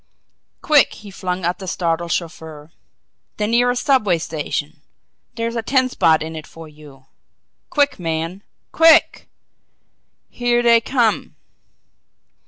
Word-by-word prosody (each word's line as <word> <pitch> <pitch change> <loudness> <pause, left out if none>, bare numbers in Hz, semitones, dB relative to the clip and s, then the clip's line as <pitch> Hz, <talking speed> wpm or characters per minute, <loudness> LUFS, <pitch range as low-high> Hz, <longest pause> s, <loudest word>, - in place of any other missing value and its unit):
"Quick!" 300 -3 +4
he 205 -2 -12
flung 185 -2 -4
at 175 +3 -1
the 190 - -8
startled 170 -1 -2
chauffeur. 160 -2 -6 0.7
"The 210 - -1
nearest 245 +2 +1
subway 215 -11 +2
station 155 -1 -5 0.5
there's 230 0 -3
a 230 - -1
ten 260 +2 +1
spot 160 -9 +2
in 160 0 -7
it 155 -1 -8
for 165 -1 -12
you! 150 -3 -16 0.6
Quick 285 -6 +1
man 165 +2 -4 0.3
QUICK! 325 -1 +4 1.0
Here 240 0 0
they 235 -1 +5
come!" 235 -3 0
185 Hz, 120 wpm, -19 LUFS, 160-240 Hz, 1.0 s, they